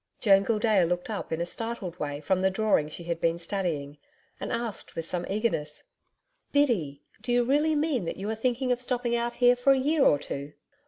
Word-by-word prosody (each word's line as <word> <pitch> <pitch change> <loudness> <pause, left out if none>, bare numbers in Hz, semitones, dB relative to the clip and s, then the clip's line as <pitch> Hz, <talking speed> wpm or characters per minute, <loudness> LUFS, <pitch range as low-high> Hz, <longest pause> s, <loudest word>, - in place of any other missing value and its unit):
Joan 195 -3 +5
Gildea 215 -3 +3
looked 180 +4 -1
up 210 - -5
in 160 - -1
a - - 0
startled 205 -3 -5
way 145 -1 -3
from 185 +4 +1
the 190 - +3
drawing 195 -6 +1
she 170 - -5
had 170 -1 -3
been 165 0 +2
studying, 165 -6 -3 0.4
and - - -4
asked 230 -2 -4
with 165 - -3
some 175 +1 -3
eagerness: 195 -8 -1 0.7
'Biddy, 190 - +1 0.2
do 245 - -3
you 245 0 +4
really 295 +5 +2
mean 290 - 0
that - - -4
you 195 - -5
are - - 0
thinking 250 +3 -1
of 245 0 0
stopping 245 -1 -1
out 235 0 -1
here 245 0 +4
for 245 +3 +4
a - - +1
year 290 +2 +2
or 145 - +5
two?' 140 +1 -6
210 Hz, 210 wpm, -27 LUFS, 170-245 Hz, 0.7 s, Joan